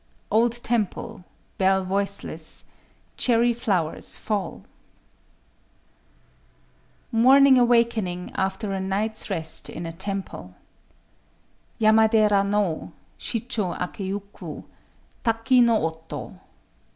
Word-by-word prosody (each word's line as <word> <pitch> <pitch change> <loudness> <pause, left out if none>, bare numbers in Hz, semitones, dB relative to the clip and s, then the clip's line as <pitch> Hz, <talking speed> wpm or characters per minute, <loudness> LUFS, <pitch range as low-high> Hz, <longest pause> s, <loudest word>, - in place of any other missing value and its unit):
—"Old 230 +2 +3
temple: 210 -5 -2 0.3
bell 190 0 +3
voiceless; 190 -4 -2 0.5
cherry 240 -1 +3
flowers 195 -9 -1
fall." 200 -5 -3 2.5
MORNING 260 +3 +6
AWAKENING 230 -7 +1
AFTER 195 +2 -2
A 195 - -2
NIGHT'S 205 +3 -2
REST 160 -1 -2
IN 170 - -6
A 165 - -4
TEMPLE 190 - -6 1.2
Yamadera 215 -2 +4
no 200 -5 -1 0.3
Shichō 220 -6 -3
akéyuku: 195 +2 -6 0.6
Taki 235 +2 +3
no 230 -7 +3
oto. 160 0 -6
205 Hz, 80 wpm, -24 LUFS, 190-230 Hz, 2.5 s, MORNING